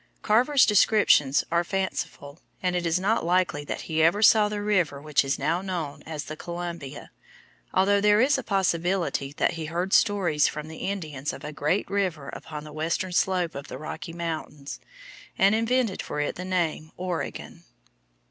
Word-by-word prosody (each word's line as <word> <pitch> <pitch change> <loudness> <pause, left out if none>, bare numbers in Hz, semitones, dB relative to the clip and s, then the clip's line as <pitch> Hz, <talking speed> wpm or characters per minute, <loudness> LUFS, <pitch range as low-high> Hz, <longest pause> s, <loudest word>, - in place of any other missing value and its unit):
Carver's 255 +6 +4
descriptions 200 -9 +4
are 170 +1 +2
fanciful, 175 -5 -4 0.2
and 180 -1 +1
it 175 -1 0
is 165 +2 +1
not 205 +4 +1
likely 175 -4 +1
that - - -4
he 160 -1 -1
ever 170 +7 +3
saw 210 -1 +6
the 205 0 -3
river 180 -9 +1
which 150 -1 +1
is 135 +1 -1
now 165 +6 0
known 175 -7 -4
as 155 -2 -4
the 155 - -7
Columbia, 170 -4 -6 0.6
although 200 +2 +3
there 210 0 +5
is 270 +4 +4
a - - -1
possibility 180 -6 0
that - - +2
he 165 -1 -5
heard 175 +5 -2
stories 190 -9 +3
from 150 +1 -5
the 160 - -9
Indians 155 -8 -4
of - - -10
a 150 - -6
great 150 +7 0
river 185 -8 -2
upon 150 -1 -8
the 150 -1 -10
western 165 +4 -2
slope 180 -1 +1
of 140 0 -7
the - - -7
Rocky 155 +1 -7
Mountains, 160 -4 -5 0.6
and 195 +2 +5
invented 230 -1 +1
for - - -5
it 145 - -1
the 180 - -7
name 170 -4 -1
Oregon. 180 -2 -5
175 Hz, 175 wpm, -26 LUFS, 155-195 Hz, 0.6 s, saw